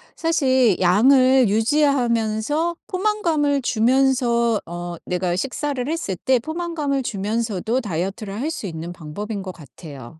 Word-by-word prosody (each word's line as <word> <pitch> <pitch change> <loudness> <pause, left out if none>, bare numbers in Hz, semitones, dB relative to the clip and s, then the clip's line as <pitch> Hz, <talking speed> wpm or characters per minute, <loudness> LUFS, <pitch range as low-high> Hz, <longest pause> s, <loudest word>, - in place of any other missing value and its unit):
사실 260 - +2
양을 255 +6 +5
유지하면서 240 +4 +1
포만감을 340 -8 0
주면서 240 -2 +2
어 175 0 -6
내가 180 -1 -1
식사를 270 +4 -3
했을 315 - -2
때 260 +4 +2
포만감을 315 -2 -3
주면서도 220 +2 -2
다이어트를 195 +2 -4
할 305 - -1
수 225 - -6
있는 170 -1 -6
방법인 195 +6 -6
거 185 - -6
같아요. 145 -2 -12
235 Hz, 290 characters per minute, -21 LUFS, 190-280 Hz, -, 양을